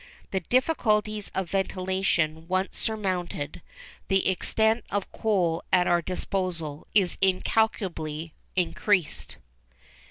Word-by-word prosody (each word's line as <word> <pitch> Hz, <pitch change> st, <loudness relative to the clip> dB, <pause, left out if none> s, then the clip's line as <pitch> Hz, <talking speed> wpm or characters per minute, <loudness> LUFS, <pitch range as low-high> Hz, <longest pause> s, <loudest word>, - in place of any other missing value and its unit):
_The 190 Hz, -3 st, -3 dB
difficulties 215 Hz, -6 st, +2 dB
of 190 Hz, -3 st, -2 dB
ventilation 185 Hz, -4 st, 0 dB
once 185 Hz, +2 st, 0 dB
surmounted, 185 Hz, -8 st, -2 dB, 0.5 s
the 195 Hz, -1 st, +2 dB
extent 220 Hz, +4 st, +2 dB
of 200 Hz, -1 st, -2 dB
coal 180 Hz, -7 st, +1 dB
at 180 Hz, -1 st, +5 dB
our 175 Hz, -1 st, +3 dB
disposal 175 Hz, -4 st, -3 dB
is 190 Hz, -4 st, +3 dB
incalculably 185 Hz, -5 st, 0 dB, 0.2 s
increased. 185 Hz, -1 st, 0 dB
190 Hz, 95 wpm, -27 LUFS, 170-205 Hz, 0.5 s, at